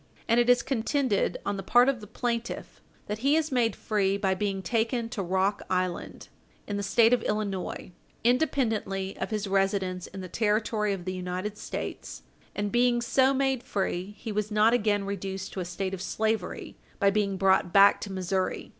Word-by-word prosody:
And 230 Hz, +1 st, +4 dB
it 240 Hz, 0 st, +3 dB
is 245 Hz, -1 st, +5 dB
contended, 260 Hz, -3 st, 0 dB
on 205 Hz, 0 st, -1 dB
the -, -, -3 dB
part 245 Hz, +6 st, +5 dB
of 265 Hz, -4 st, +1 dB
the 210 Hz, -, -10 dB
plaintiff, 235 Hz, +2 st, -4 dB, 0.2 s
that 210 Hz, +1 st, -4 dB
he 275 Hz, +5 st, +3 dB
is 315 Hz, -1 st, 0 dB
made 235 Hz, -5 st, +2 dB
free 200 Hz, -2 st, 0 dB
by 195 Hz, -2 st, +1 dB
being 195 Hz, 0 st, -2 dB
taken 230 Hz, +4 st, 0 dB
to 230 Hz, -4 st, -4 dB
Rock 190 Hz, +2 st, 0 dB
Island, 185 Hz, -1 st, -2 dB, 0.4 s
in 205 Hz, -, -4 dB
the 200 Hz, -, -1 dB
State 225 Hz, +4 st, +4 dB
of 250 Hz, -, +3 dB
Illinois, 200 Hz, -4 st, -3 dB, 0.3 s
independently 225 Hz, -7 st, 0 dB
of -, -, -2 dB
his 215 Hz, -1 st, -2 dB
residence 195 Hz, -2 st, 0 dB
in 195 Hz, -, -8 dB
the 185 Hz, -, -6 dB
territory 210 Hz, +1 st, 0 dB
of 180 Hz, -3 st, -6 dB
the 185 Hz, -, -2 dB
United 185 Hz, +3 st, -4 dB
States, -, -, -6 dB, 0.3 s
and 205 Hz, 0 st, -2 dB
being 240 Hz, 0 st, +3 dB
so 260 Hz, +3 st, +3 dB
made 270 Hz, -2 st, +1 dB
free, 195 Hz, -2 st, -3 dB
he 225 Hz, +1 st, -6 dB
was 210 Hz, 0 st, -1 dB
not 215 Hz, +2 st, +4 dB
again 210 Hz, -4 st, +2 dB
reduced 195 Hz, -1 st, -5 dB
to -, -, -4 dB
a 180 Hz, -, -2 dB
state 190 Hz, +2 st, -4 dB
of 185 Hz, -, -5 dB
slavery 215 Hz, -1 st, -2 dB, 0.2 s
by 200 Hz, 0 st, +4 dB
being 200 Hz, -2 st, 0 dB
brought 190 Hz, -2 st, +3 dB
back 200 Hz, +1 st, +6 dB
to 200 Hz, -, -5 dB
Missouri. 185 Hz, 0 st, -2 dB
205 Hz, 185 wpm, -27 LUFS, 195-235 Hz, 0.4 s, back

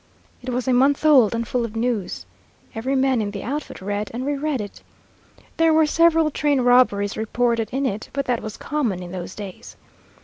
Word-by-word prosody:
It 255 Hz, -, -6 dB
was 250 Hz, +1 st, -2 dB
a 260 Hz, -, +3 dB
month 275 Hz, +4 st, +3 dB
old 255 Hz, -8 st, +5 dB
and 230 Hz, 0 st, -2 dB
full 245 Hz, +1 st, -1 dB
of 230 Hz, -1 st, -5 dB
news. 225 Hz, -, -2 dB, 0.5 s
Every 255 Hz, +5 st, -2 dB
man 265 Hz, -3 st, +2 dB
in 205 Hz, -, -2 dB
the 200 Hz, -1 st, -6 dB
outfit 280 Hz, -6 st, -5 dB
read 205 Hz, +1 st, -3 dB
and 255 Hz, +2 st, -3 dB
reread 290 Hz, -1 st, -1 dB
it. 205 Hz, -1 st, -7 dB, 0.8 s
There 325 Hz, -1 st, +4 dB
were 315 Hz, 0 st, +5 dB
several 325 Hz, 0 st, +3 dB
train 290 Hz, -2 st, +1 dB
robberies 245 Hz, -5 st, +3 dB
reported 230 Hz, 0 st, 0 dB
in 275 Hz, +2 st, -1 dB
it, 210 Hz, -3 st, -3 dB
but 275 Hz, -1 st, -2 dB
that 245 Hz, -2 st, -1 dB
was 215 Hz, -1 st, -7 dB
common 240 Hz, -12 st, -2 dB
in 175 Hz, -, -9 dB
those 185 Hz, 0 st, -6 dB
days. 200 Hz, -3 st, -9 dB
245 Hz, 195 wpm, -22 LUFS, 210-275 Hz, 0.8 s, old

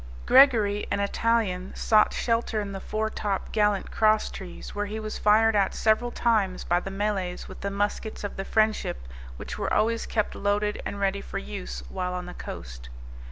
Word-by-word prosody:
Gregory, 225 Hz, -7 st, +5 dB
an 200 Hz, -, 0 dB
Italian, 200 Hz, -3 st, 0 dB
sought 215 Hz, -1 st, +4 dB
shelter 230 Hz, -2 st, 0 dB
in 205 Hz, -1 st, -4 dB
the 195 Hz, -, -5 dB
foretop 215 Hz, -2 st, -2 dB
gallant 210 Hz, -2 st, +1 dB
cross 215 Hz, 0 st, +3 dB
trees, 185 Hz, -3 st, -8 dB
where 205 Hz, 0 st, -2 dB
he 215 Hz, +2 st, -4 dB
was 215 Hz, 0 st, -5 dB
fired 220 Hz, +1 st, +4 dB
at 195 Hz, -2 st, +2 dB
several 220 Hz, +2 st, +2 dB
times 215 Hz, -6 st, +1 dB
by 175 Hz, +1 st, +2 dB
the 195 Hz, -, -6 dB
Malays 195 Hz, -2 st, -2 dB
with 190 Hz, -, -11 dB
the 200 Hz, -, -2 dB
muskets 205 Hz, +2 st, -2 dB
of 205 Hz, -, -4 dB
the 195 Hz, -, -3 dB
Friendship, 215 Hz, -, 0 dB, 0.3 s
which -, -, -7 dB
were -, -, -2 dB
always 230 Hz, +1 st, +1 dB
kept 215 Hz, -2 st, -1 dB
loaded 205 Hz, +1 st, 0 dB
and 200 Hz, -, -5 dB
ready 200 Hz, 0 st, 0 dB
for -, -, -6 dB
use -, -, -6 dB
while 180 Hz, -, -3 dB
on 180 Hz, 0 st, -4 dB
the 180 Hz, -, -8 dB
coast. -, -, -8 dB
205 Hz, 180 wpm, -26 LUFS, 190-215 Hz, 0.3 s, Gregory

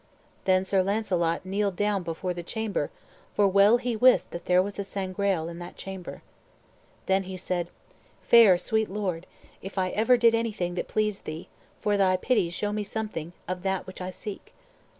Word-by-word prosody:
Then 185 Hz, 0 st, +3 dB
Sir 190 Hz, 0 st, +2 dB
Launcelot 185 Hz, -4 st, 0 dB
kneeled 200 Hz, 0 st, -1 dB
down 205 Hz, 0 st, +1 dB
before 175 Hz, +2 st, -3 dB
the 175 Hz, -, -5 dB
chamber, 205 Hz, -4 st, -2 dB, 0.5 s
for 205 Hz, -, +4 dB
well 200 Hz, +4 st, +5 dB
he 245 Hz, -1 st, -2 dB
wist 250 Hz, +3 st, +4 dB
that 170 Hz, -, -7 dB
there 180 Hz, 0 st, +4 dB
was 200 Hz, +1 st, -5 dB
the 200 Hz, -, -4 dB
Sangreal 190 Hz, -3 st, -1 dB
in 170 Hz, 0 st, -7 dB
that 175 Hz, -, -9 dB
chamber. 190 Hz, -2 st, -8 dB, 0.8 s
Then 190 Hz, 0 st, +2 dB
said 175 Hz, -1 st, -2 dB
he, -, -, -32 dB
"Fair, 220 Hz, -6 st, +8 dB
sweet 220 Hz, +3 st, 0 dB
Lord, 185 Hz, -4 st, -3 dB, 0.3 s
if 195 Hz, +1 st, -9 dB
ever 205 Hz, +6 st, +2 dB
I -, -, +6 dB
did 230 Hz, -1 st, +5 dB
anything 215 Hz, -6 st, -1 dB
that 180 Hz, -, -3 dB
pleased 215 Hz, -2 st, -1 dB
thee, 155 Hz, +3 st, -7 dB, 0.3 s
for 205 Hz, -1 st, +1 dB
thy 185 Hz, -2 st, +3 dB
pity 205 Hz, -3 st, +1 dB
show 205 Hz, +4 st, -2 dB
me 210 Hz, 0 st, -1 dB
something 205 Hz, -6 st, -5 dB
of 180 Hz, 0 st, -3 dB
that 190 Hz, 0 st, -1 dB
which 190 Hz, 0 st, -9 dB
I 180 Hz, -, -3 dB
seek." 200 Hz, +2 st, -8 dB
195 Hz, 180 wpm, -27 LUFS, 180-210 Hz, 0.8 s, Fair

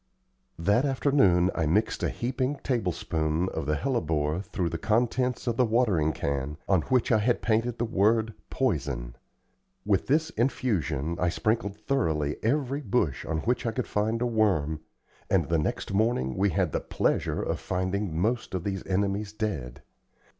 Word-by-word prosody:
That 100 Hz, +9 st, +2 dB
afternoon 130 Hz, -10 st, +3 dB
I 80 Hz, -3 st, 0 dB
mixed 105 Hz, +8 st, +1 dB
a -, -, +1 dB
heaping 130 Hz, +3 st, -1 dB
tablespoonful 85 Hz, -, -1 dB
of 80 Hz, -3 st, -3 dB
the 75 Hz, -, +2 dB
hellebore 80 Hz, -, 0 dB
through 95 Hz, -3 st, -2 dB
the 85 Hz, -, -4 dB
contents 125 Hz, +4 st, +1 dB
of 120 Hz, -2 st, -1 dB
the 130 Hz, -, +5 dB
watering 110 Hz, -10 st, +2 dB
can, 70 Hz, 0 st, -3 dB
on 95 Hz, -4 st, +3 dB
which 130 Hz, -2 st, +2 dB
I 110 Hz, -, +5 dB
had 120 Hz, +3 st, +1 dB
painted 115 Hz, +1 st, +1 dB
the 120 Hz, -, 0 dB
word 110 Hz, +1 st, +2 dB, 0.2 s
"Poison." 70 Hz, -, -1 dB, 0.7 s
With 100 Hz, -2 st, +1 dB
this 160 Hz, +4 st, +2 dB
infusion 85 Hz, -, -1 dB
I 90 Hz, -, +2 dB
sprinkled 105 Hz, +1 st, -1 dB
thoroughly 80 Hz, -, 0 dB
every 140 Hz, +3 st, 0 dB
bush 105 Hz, -, 0 dB
on 80 Hz, -1 st, -1 dB
which 125 Hz, +2 st, 0 dB
I -, -, +1 dB
could 125 Hz, +2 st, -2 dB
find 110 Hz, +3 st, 0 dB
a -, -, +1 dB
worm, 95 Hz, -10 st, +1 dB, 0.5 s
and -, -, +2 dB
the 85 Hz, -1 st, +2 dB
next 75 Hz, -, -2 dB
morning 100 Hz, -, +1 dB
we 100 Hz, +2 st, +2 dB
had 90 Hz, -2 st, 0 dB
the -, -, 0 dB
pleasure -, -, 0 dB
of -, -, -2 dB
finding 95 Hz, -1 st, -2 dB
most 110 Hz, +2 st, 0 dB
of 90 Hz, -, -2 dB
these 95 Hz, -2 st, -3 dB
enemies 100 Hz, +2 st, 0 dB
dead. 80 Hz, -, -4 dB
100 Hz, 160 wpm, -27 LUFS, 80-120 Hz, 0.7 s, the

